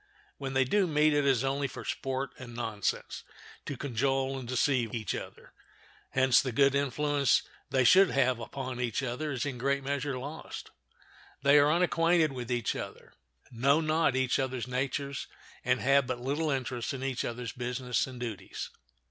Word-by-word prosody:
When 135 -1 -4
they 130 - +5
do 190 +9 +2
meet 155 -1 +3
it 145 -1 +2
is 135 -2 +3
only 140 +1 0
for 130 - -9
sport 135 -1 -2
and 120 -2 -9
nonsense, 110 -4 -3 0.4
to 140 - -4
cajole 135 +1 0
and 125 - -8
deceive 125 -2 +1
each 110 -4 -2
other. - - -8 0.6
Hence 130 -1 +4
the 130 - -3
good 140 +3 +4
influence 140 0 +2 0.3
they 130 -1 +3
should 190 +9 +7
have 130 -3 +2
upon 130 +1 -5
each 120 +2 -1
other 130 +5 -2
is 130 0 -2
in 135 -3 -3
a - - -11
great 140 +2 0
measure 140 0 -2
lost. 145 +5 -7 0.7
They 140 +1 +7
are 145 +1 +5
unacquainted 165 -2 +3
with 125 -2 -5
each 120 -2 0
other, - - -8 0.4
know 135 +5 +3
not 155 -3 +2
each 130 +1 +1
other's 130 -2 -2
natures, 135 +2 -2 0.4
and 125 +1 +2
have 135 0 +4
but 130 -2 -2
little 145 +5 -1
interest 130 -2 -2
in 130 - -6
each 135 -2 -1
other's 120 -1 -4
business 125 +1 -1
and 130 -2 -9
duties. 110 -6 -5
135 Hz, 175 wpm, -30 LUFS, 125-140 Hz, 0.7 s, should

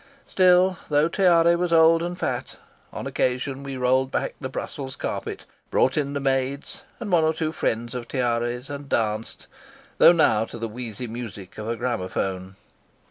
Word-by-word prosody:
Still, 185 -1 +4
though 150 +1 +3
Tiare 170 -2 +4
was 175 0 -1
old 165 0 +6
and 175 +1 -3
fat, - - -3 0.4
on - - -6
occasion 130 +2 -1
we 135 -1 -6
rolled 130 +1 +2
back - - -2
the 130 - -4
Brussels 130 0 -6
carpet, - - -5 0.2
brought 130 - +2
in 140 -2 -1
the 140 - -1
maids 135 0 -2 0.2
and 220 -5 -5
one 170 -3 +4
or 160 0 +2
two 155 -1 -1
friends 120 -5 -2
of 120 -2 -5
Tiare's, 120 0 -1
and 145 -1 -7
danced, 110 -1 -1 0.5
though - - +9
now 115 -11 +3
to 115 - -9
the 115 0 -3
wheezy 115 +1 -6
music 110 -5 -8
of 105 - -5
a 115 - -2
gramaphone. 95 -4 -3
130 Hz, 170 wpm, -24 LUFS, 115-160 Hz, 0.5 s, though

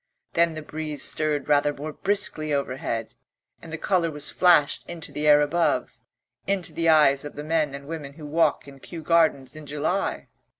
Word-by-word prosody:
Then 170 -1 +2
the 155 - -6
breeze 155 -1 -5
stirred 155 -2 -1
rather 145 0 +3
more 150 +2 -7
briskly 185 -6 0
overhead 130 -5 -3 0.5
and 165 - -11
the 165 - -4
colour 175 -1 +1
was 150 -1 -3
flashed 175 -5 +3
into 170 -2 -7
the 150 +1 -2
air 150 0 +7
above, 165 +4 0 0.5
into 195 -3 0
the 165 -1 +1
eyes 145 -3 +5
of 145 - -8
the 145 - -6
men 155 -2 0
and 140 0 -9
women 150 -2 -7
who 150 0 -11
walk 155 0 +1
in 140 -1 -13
Kew 165 +3 -9
Gardens 155 -5 +2
in 155 -1 -10
July. 150 +7 -2
155 Hz, 180 wpm, -24 LUFS, 145-165 Hz, 0.5 s, air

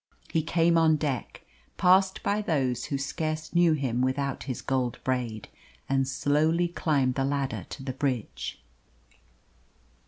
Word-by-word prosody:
He 160 - +2
came 165 +1 +3
on 160 -1 +5
deck, 145 -5 -3 0.3
passed 190 +1 +4
by 205 +1 +1
those 135 - 0
who 140 - -2
scarce 155 +3 -3
knew 170 -2 +5
him 130 -5 -1
without 135 +1 -1
his 130 -3 -4
gold 130 -3 -1
braid, 120 -5 -2 0.4
and 135 -1 +1
slowly 155 +6 +1
climbed 140 -7 +1
the 135 - -1
ladder 135 -8 -2
to 135 - -8
the 130 -1 -3
bridge. 130 -4 -3
140 Hz, 135 wpm, -27 LUFS, 130-160 Hz, 0.4 s, on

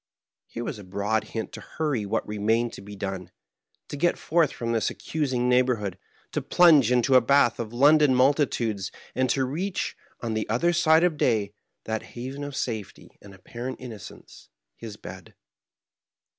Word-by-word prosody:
Here 120 - -6
was 110 - -5
a - - -10
broad 100 +4 -1
hint 110 -1 -5
to - - -9
hurry 145 -10 -2
what - - -1
remained 110 +3 0
to - - -9
be 100 +1 -10
done, 95 -2 -5 0.6
to - - -5
geth 170 +5 +1
forth 165 -2 +2
from 115 -1 -4
this 115 -2 +1
accusing 130 -6 -2
neighborhood, 125 -7 +1 0.3
to - - -2
plunge 155 -9 +5
into 125 +1 +3
a 130 - +8
bath 125 -1 +3
of 115 -2 -4
London 145 +2 +5
multitudes, 125 -7 +1 0.2
and 130 +1 0
to 130 +2 +1
reach, 180 +9 -3 0.2
on 115 -2 -3
the 110 -1 -2
other 150 +11 +2
side 160 -1 +4
of 175 -4 +2
day, 105 -7 +1 0.3
that 110 0 -3 0.2
haven 135 +4 -5
of 145 -1 -6
safety 110 -7 -5
and 100 -1 -13
appar 120 +6 -8
ent 130 - -5
innocence 110 - -11
— - - -42
^his 110 -3 -8
bed. 95 -1 -11
120 Hz, 170 wpm, -26 LUFS, 105-140 Hz, 0.6 s, a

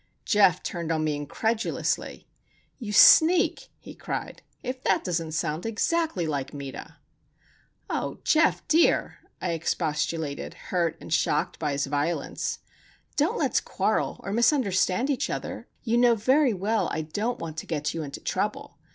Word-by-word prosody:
Geof 195 -4 +4
turned 170 -2 -3
on 160 -1 0
me 155 -1 0
incredulously. 220 - -2 0.5
"You 225 -5 -5
sneak!" 335 - +6
he - - -12
cried. - - -5 0.2
"If 255 0 -5
that - - +2
doesn't 165 -3 -2
sound 155 +1 -2
exactly 225 - 0
like 145 -2 -3
Meta!" 140 -1 -8 0.9
"Oh, - - -3
Geof 315 0 +3
dear!" 320 +2 +3 0.2
I 180 - -2
expostulated, 160 -2 -2
hurt 170 -3 -2
and - - -5
shocked 150 -1 0
by 150 -3 -1
his 140 +1 0
violence. 145 +2 -2 0.6
"Don't - - +1
let's - - +1
quarrel, - - -1
or 195 - -4
misunderstand 235 -1 +2
each 265 - -1
other. - - -5 0.2
You 235 0 +2
know 240 -1 +5
very 255 +2 +3
well 210 +4 0
I 160 - -2
don't 210 +10 -2
want 160 -1 -7
to - - -6
get 150 -3 -2
you 165 - -3
into 140 -2 -7
trouble. - - -3
180 Hz, 145 wpm, -26 LUFS, 155-235 Hz, 0.9 s, sneak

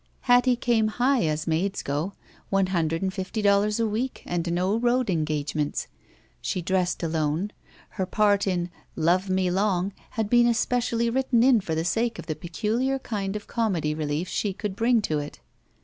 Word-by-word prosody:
Hattie 245 0 +4
came 235 -3 +2
high, 245 0 +2
as 155 0 -1
maids 185 +5 -1
go. 150 +8 -2 0.4
One 195 -1 +3
hundred 165 0 0
and 190 -1 -1
fifty 190 +3 -4
dollars 205 +2 +3
a 230 - +2
week 225 +5 -2
and 170 -1 -2
no 180 +4 +1
road 240 -1 +1
engagements. 150 -2 -1 0.5
She - - -2
dressed 180 0 0
alone. 160 +4 -1 0.4
Her 190 -3 -3
part 205 0 +2
in 180 -2 -1 0.2
"Love 175 +4 +2
Me 185 -1 +1
Long'* 190 0 +1 0.2
had 220 -2 +1
been 240 +2 +5
especially 235 0 +1
written 255 -2 +2
in 250 -4 +5
for 160 -4 -3
the 160 +1 -1
sake 230 +5 0
of - - -7
the 155 -1 -3
peculiar 225 - -1
kind 205 -6 -4
of 210 - -5
comedy 185 -10 0
relief 155 +2 -2
she 200 +2 -1
could 205 0 -4
bring 230 0 +2
to 155 -5 0
it. 145 0 -7
195 Hz, 175 wpm, -26 LUFS, 170-230 Hz, 0.5 s, been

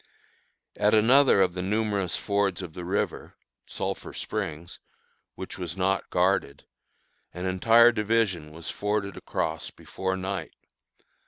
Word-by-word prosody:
At 105 +1 +3
another 120 -1 +5
of 90 -2 0
the 90 - -4
numerous 100 -2 -1
fords 100 -3 0
of 85 -3 -8
the 90 - -7
river 95 +3 -2 0.3
(Sulphur - - -4
Springs), 80 +3 -5 0.6
which - - -7
was 90 0 -5
not 95 +1 0
guarded, 90 -6 0 0.7
an 90 +1 -4
entire 115 +6 +5
division 105 -8 0
was 80 +1 -7
forded 105 -2 -2
across 80 0 -3
before 95 0 -4
night. 95 -3 -4
95 Hz, 120 wpm, -27 LUFS, 90-105 Hz, 0.7 s, another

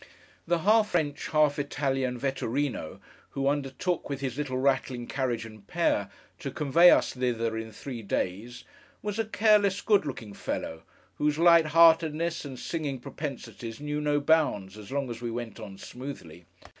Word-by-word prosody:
The 175 +1 +3
half 215 0 +5
French, 150 -6 -1
half 150 -2 +3
Italian 135 -3 -1
Vetturíno, 135 - -2 0.3
who 135 0 -2
undertook, 145 +6 -1
with 140 -2 -3
his 130 -3 -3
little 140 -3 -2
rattling 130 -2 0
carriage 120 -4 -2
and 110 -3 -13
pair, - - +1 0.3
to - - -4
convey 160 +5 +5
us - - +4
thither 115 -3 -1
in 110 0 -5
three 120 +2 -7
days, 110 +4 -3 0.4
was 210 +1 -3
a 225 - +1
careless, 210 -2 +3
good 200 -7 +3
looking 115 -6 -6
fellow, 80 -4 -4 0.4
whose 150 0 +1
light 170 -1 +6
heartedness 165 +1 +4
and 135 -2 -7
singing 145 -2 -3
propensities 125 -4 -7
knew 150 0 -3
no 145 0 +2
bounds 145 -11 +2
as 105 +1 -11
long 140 -1 -1
as 115 0 -7
we 120 - -3
went 115 -1 -5
on 100 -3 -9
smoothly. 90 - -9
140 Hz, 155 wpm, -28 LUFS, 120-155 Hz, 0.4 s, light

